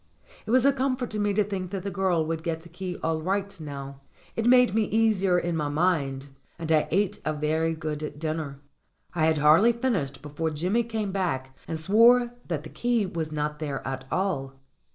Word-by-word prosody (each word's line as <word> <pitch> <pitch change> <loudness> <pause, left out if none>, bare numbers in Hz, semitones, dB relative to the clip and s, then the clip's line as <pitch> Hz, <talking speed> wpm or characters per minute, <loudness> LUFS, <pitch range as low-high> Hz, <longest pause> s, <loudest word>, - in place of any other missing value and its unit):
It - - -6
was 255 +2 +4
a 280 - +5
comfort 260 -2 -1
to 215 - -3
me 205 0 +1
to 210 - +4
think 190 -3 -4
that 190 -1 -4
the 200 - -3
girl 175 -3 +1
would 160 0 -2
get 165 -1 -3
the 170 - -13
key 180 +1 -5
all 160 -1 0
right 195 +3 -1
now; 140 -2 -7 0.3
it 225 +1 0
made 250 -3 +6
me 220 0 +2
easier 205 -4 +2
in 175 -1 -1
my 150 -2 -1
mind, 145 -4 0 0.3
and 165 -1 -4
I 155 -1 +3
ate 195 +2 0
a 155 - -1
very 160 +2 0
good 150 -1 -4
dinner. 155 -3 -3 0.5
I 160 -3 +2
had 160 -1 +2
hardly 160 +11 +6
finished 200 - -2
before 150 +2 -2
Jimmy 180 +9 0
came 220 -3 -3
back 135 -9 -2
and 160 - -3
swore 235 +7 +5 0.2
that 155 -4 -2
the 155 - -9
key 240 0 0
was 165 -4 -4
not 150 0 -2
there 145 -4 -4
at 130 0 -4
all. 160 -9 -1
170 Hz, 200 wpm, -26 LUFS, 150-205 Hz, 0.5 s, made